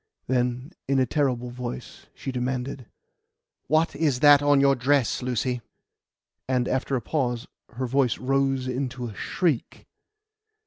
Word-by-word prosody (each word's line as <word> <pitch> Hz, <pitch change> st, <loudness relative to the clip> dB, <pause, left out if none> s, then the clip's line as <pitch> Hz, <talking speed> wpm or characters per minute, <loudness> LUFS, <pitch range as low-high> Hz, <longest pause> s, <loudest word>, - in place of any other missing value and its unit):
Then, 125 Hz, +3 st, -1 dB, 0.2 s
in 135 Hz, 0 st, +2 dB
a 130 Hz, -, +4 dB
terrible 125 Hz, -2 st, 0 dB
voice, 125 Hz, 0 st, -7 dB
she 135 Hz, -, -5 dB
demanded: 125 Hz, 0 st, -3 dB, 0.8 s
"What 155 Hz, +3 st, +2 dB
is 145 Hz, -6 st, +1 dB
that 145 Hz, -1 st, +8 dB
on 145 Hz, -1 st, +4 dB
your 140 Hz, 0 st, +5 dB
dress, 135 Hz, -1 st, +1 dB
Lucy?" 125 Hz, 0 st, -1 dB, 0.9 s
And, 125 Hz, -2 st, +1 dB
after 130 Hz, +1 st, 0 dB
a 125 Hz, -, -1 dB
pause, 125 Hz, -1 st, -1 dB, 0.3 s
her 130 Hz, +2 st, -2 dB
voice 130 Hz, -2 st, +1 dB
rose 135 Hz, 0 st, 0 dB
into 130 Hz, -1 st, -3 dB
a 115 Hz, -, -6 dB
shriek. 155 Hz, -, -2 dB
130 Hz, 135 wpm, -25 LUFS, 125-140 Hz, 0.9 s, that